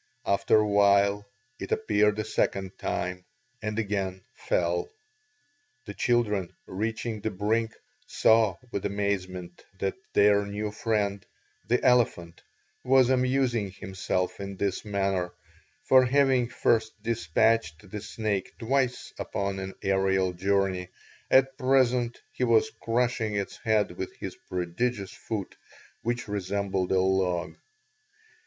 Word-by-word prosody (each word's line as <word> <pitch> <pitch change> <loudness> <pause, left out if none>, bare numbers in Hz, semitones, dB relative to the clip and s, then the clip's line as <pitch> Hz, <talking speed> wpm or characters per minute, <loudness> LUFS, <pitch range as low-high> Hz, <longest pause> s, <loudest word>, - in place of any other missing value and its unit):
After 100 +2 +3
a 105 0 +3
while 100 0 +3 0.3
it - - -6
appeared 105 - +2
a 110 - -1
second 95 -3 -1
time 90 +1 -3 0.4
and 110 0 -3
again 100 -4 -2
fell. 460 - -1 1.0
The 100 - -7
children, 105 -7 0
reaching 110 +2 -3
the 110 - -1
brink, 110 +3 -1 0.3
saw 110 -4 +4 0.2
with 100 - -3
amazement 95 -3 -3
that 95 0 -1 0.2
their 100 0 +5
new 105 +1 -3
friend, 105 -2 -1 0.4
the 125 - +1
elephant, 110 -9 +2 0.4
was 130 0 +5
amusing 125 -4 +1
himself 95 -1 -3
in 100 -1 -6
this 100 -1 -1
manner, 95 -4 -1 0.5
for 130 -1 +6
having 130 -2 +3
first 110 -2 +1
despatched 105 -3 +1
the 105 - -5
snake 105 -2 -3
twice 130 +1 -1
upon 100 -1 -2
an 95 0 -6
aerial 95 -1 +2
journey, 95 0 0 0.4
at 135 0 +4
present 125 -2 +2
he - - -3
was 115 -2 +3
crushing 115 -2 0
its 100 -1 -3
head 110 -3 +1
with 90 +1 -6
his - - -6
prodigious 95 +3 -2
foot 105 -4 -5 0.5
which 120 +1 -2
resembled 100 -2 -2
a 95 - +4
log. 95 -2 +1
105 Hz, 120 wpm, -27 LUFS, 95-115 Hz, 1.0 s, for